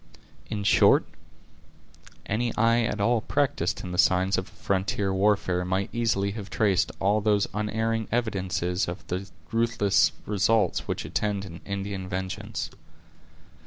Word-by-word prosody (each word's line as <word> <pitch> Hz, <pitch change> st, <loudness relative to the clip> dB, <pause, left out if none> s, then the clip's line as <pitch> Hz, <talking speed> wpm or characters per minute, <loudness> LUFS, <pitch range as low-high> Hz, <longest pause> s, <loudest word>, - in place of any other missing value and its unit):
In 105 Hz, -2 st, -3 dB
short, 100 Hz, -, +5 dB, 1.2 s
any 115 Hz, +3 st, -1 dB
eye 115 Hz, +2 st, +3 dB
at 110 Hz, -2 st, -1 dB
all 115 Hz, +2 st, +2 dB
practised 115 Hz, -, 0 dB
in 90 Hz, -, -6 dB
the 90 Hz, -, -3 dB
signs 95 Hz, +1 st, +4 dB
of 95 Hz, -, -2 dB
a -, -, -17 dB
frontier 95 Hz, 0 st, -1 dB
warfare 95 Hz, -2 st, +2 dB
might 95 Hz, +2 st, -1 dB
easily 110 Hz, -4 st, +1 dB
have 105 Hz, -1 st, -7 dB
traced 95 Hz, -5 st, +2 dB
all 100 Hz, +2 st, +2 dB
those 105 Hz, -1 st, +2 dB
unerring 110 Hz, +1 st, -1 dB
evidences 95 Hz, -6 st, -1 dB
of 85 Hz, +3 st, -6 dB
the 95 Hz, +2 st, -3 dB, 0.2 s
ruthless 115 Hz, -3 st, +3 dB
results 105 Hz, +2 st, +1 dB
which -, -, -3 dB
attend 100 Hz, -2 st, -1 dB
an 85 Hz, -2 st, -10 dB
Indian 100 Hz, -1 st, -4 dB
vengeance. 95 Hz, +4 st, -4 dB
100 Hz, 135 wpm, -26 LUFS, 95-110 Hz, 1.2 s, short